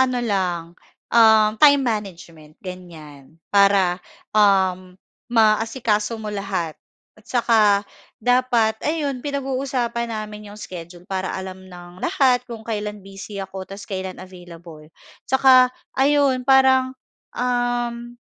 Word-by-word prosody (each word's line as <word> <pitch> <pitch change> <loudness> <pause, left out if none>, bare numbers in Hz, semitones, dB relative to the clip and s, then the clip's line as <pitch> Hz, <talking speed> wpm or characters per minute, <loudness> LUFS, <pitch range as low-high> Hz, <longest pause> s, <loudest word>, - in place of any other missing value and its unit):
ano 255 -1 +2
lang, 185 -5 -1 0.5
um, 220 -2 +6
time 285 -2 +6
management 170 -8 -6
ganiyan 160 -5 -11 0.2
para, 195 -2 +3 0.3
um, 190 -3 +2 0.3
maasikaso 225 0 +1
mo 215 -1 -6
lahat 190 -5 -3 0.4
at 215 - -23
saka 235 -2 +2 0.6
dapat 240 -2 +1
ayun 290 -5 -2
pinag-uusapan 260 -4 -2
namin 210 -1 -7
yung 205 - -11
schedule 175 -3 -10
para 190 -1 -3
alam 190 0 -8
ng 175 0 -13
lahat 265 -8 +2
kung 225 -2 -8
kailan 210 -3 -5
busy 195 +1 -10
ako 190 -1 -7
ta's 195 +1 -9
kailan 190 -1 -5
available, 170 -4 -13 0.4
tsaka 260 -1 +6 0.2
ayun 270 -2 +2
parang, 260 -1 +4 0.4
um, 240 -1 -2
215 Hz, 110 wpm, -21 LUFS, 185-245 Hz, 0.6 s, um